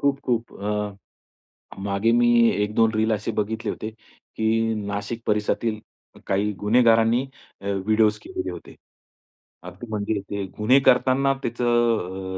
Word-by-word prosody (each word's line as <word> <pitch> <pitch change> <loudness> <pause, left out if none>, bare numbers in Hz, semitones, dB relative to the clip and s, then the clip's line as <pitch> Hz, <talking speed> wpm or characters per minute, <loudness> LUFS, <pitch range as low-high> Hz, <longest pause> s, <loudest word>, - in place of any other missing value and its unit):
खूप-खूप 130 -5 -1
अ, 105 0 -3 0.9
मागे 100 +3 +1
मी 120 0 +4 0.2
1-2 105 +2 +1
रील 110 +1 +1
असे 105 +2 -2
बघितले 110 +1 -2
होते 110 - -4 0.5
की 115 0 +1
नाशिक 100 +3 -4
परिसरातील 105 +1 0 0.5
काही 100 +2 +1
गुन्हेगारांनी 115 +2 +3 0.4
अ, - - -11 0.2
विडीओज 110 -1 +3
केलेले 95 0 -5
होते. 85 -1 -11 0.9
अगदी 90 +7 -10
म्हणजे 105 -1 -2
ते 100 -1 -2
गुन्हे 125 +6 +4
करतांना 130 +2 +4
त्याचं 115 -6 0
110 Hz, 115 wpm, -23 LUFS, 105-115 Hz, 0.9 s, मी